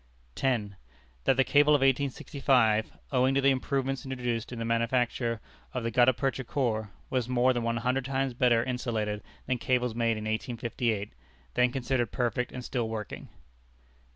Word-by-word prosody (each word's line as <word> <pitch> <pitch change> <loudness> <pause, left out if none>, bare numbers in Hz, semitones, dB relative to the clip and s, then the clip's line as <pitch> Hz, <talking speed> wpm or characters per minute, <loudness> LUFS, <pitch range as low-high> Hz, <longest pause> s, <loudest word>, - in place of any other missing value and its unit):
10. 105 - -1 0.5
That 130 - +4
the 135 - +5
cable 145 +3 +5
of 145 - +1
1865, 135 -4 +2
owing 130 0 +3
to 140 - +3
the 135 0 +5
improvements 135 +1 -1
introduced 125 -4 -3
into 120 -2 -5
the - - -2
manufacture 115 0 0 0.4
of 125 - -1
the 115 - -1
gutta 125 +2 +5
percha 135 +2 -2
core, 115 -5 -1 0.2
was 125 -2 0
more 125 +1 +3
than 120 - -1
one 115 0 0
hundred 125 +2 0
times 135 -1 -1
better 120 -1 +3
insulated 115 -5 -2 0.2
than 125 -1 -1
cables 125 -1 +1
made 115 -1 +1
in 110 - -5
1858, 110 -1 -2 0.4
then 125 0 +3
considered 125 -3 -1
perfect 125 0 -1
and 125 -1 -7
still 120 -3 -2
working. 110 -2 -6
125 Hz, 160 wpm, -29 LUFS, 115-130 Hz, 0.5 s, the